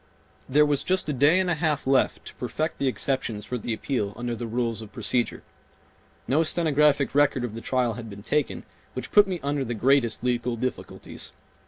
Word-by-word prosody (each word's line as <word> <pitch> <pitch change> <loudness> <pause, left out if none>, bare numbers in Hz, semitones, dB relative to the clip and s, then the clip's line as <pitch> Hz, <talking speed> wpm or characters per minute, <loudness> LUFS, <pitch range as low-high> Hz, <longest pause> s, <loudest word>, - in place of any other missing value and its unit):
There 150 +3 +5
was 145 -2 +1
just 185 -2 0
a - - +1
day 145 +7 +4
and 190 - +1
a 175 - +2
half 155 -2 0
left 135 0 +2
to - - -8
perfect 155 +6 -3
the 140 - +1
exceptions 125 -5 -1
for 125 - -3
the 115 - -4
appeal 110 -3 -2
under 120 -1 -3
the 115 +1 -5
rules 115 -1 -2
of 110 -1 -10
procedure. 120 -2 -1 0.8
No 150 +4 +3
stenographic 150 -4 +2
record 145 -3 +3
of 120 -3 -3
the 115 - -6
trial 125 -2 0
had 115 0 -8
been 100 0 -10
taken, 150 +4 -1 0.3
which - - -6
put 205 -1 +7
me 185 -2 -3
under 140 0 0
the 120 -2 -3
greatest 125 0 +2
legal 125 -1 0
difficulties. 125 +2 -5
130 Hz, 195 wpm, -26 LUFS, 120-150 Hz, 0.8 s, put